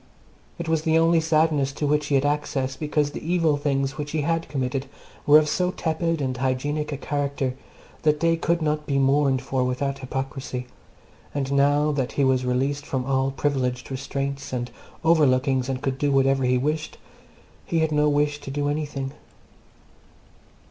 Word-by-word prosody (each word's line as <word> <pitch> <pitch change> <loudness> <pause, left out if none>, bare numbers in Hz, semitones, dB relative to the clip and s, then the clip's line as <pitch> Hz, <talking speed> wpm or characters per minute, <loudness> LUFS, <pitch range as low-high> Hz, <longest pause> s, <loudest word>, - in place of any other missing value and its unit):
It 170 -2 -5
was 160 -1 +1
the 160 0 +2
only 165 0 +4
sadness 155 -3 +2
to 150 - -2
which 150 0 +1
he 145 - +1
had 135 +1 +2
access, 145 -3 -1
because 150 0 0
the - - -7
evil 165 -2 +2
deeds 140 -1 -1
which 145 0 -4
he 155 - +1
had 165 +2 -1
committed 135 -1 -2 0.4
were 145 +1 +9
of 155 -1 +3
so 180 +4 +1
tepid 165 -2 -1
and 130 -1 -1
hygienic 135 +4 -1
a 140 - -3
character 140 -2 -2 0.5
that 150 -1 +2
they 165 +1 +3
could 165 0 0
not 150 0 -1
be 140 - +1
mourned 135 -1 +3
for 130 -1 0
without 135 +2 -1
hypocrisy, 130 -1 -4 0.7
and 140 -1 -1
now 145 +2 +3
that 135 -4 -2
he 140 - +1
was 130 -1 +2
released 135 +3 0
from 130 -3 -3
all 135 0 +1
privileged 135 -2 -1
restraints 140 +1 -4
and 120 -1 -3 0.3
overlookings 135 -5 +3
and 130 0 -3
could 135 -2 -2
do 145 -1 +1
whatever 135 -1 +3
he 125 0 +3
wished 150 +4 -2 0.7
he 165 -1 0
had 160 -1 +1
no 150 0 +3
wish 145 0 +1
to - - -8
do 145 +1 -1
anything. 145 -3 -3
145 Hz, 175 wpm, -24 LUFS, 135-150 Hz, 0.7 s, were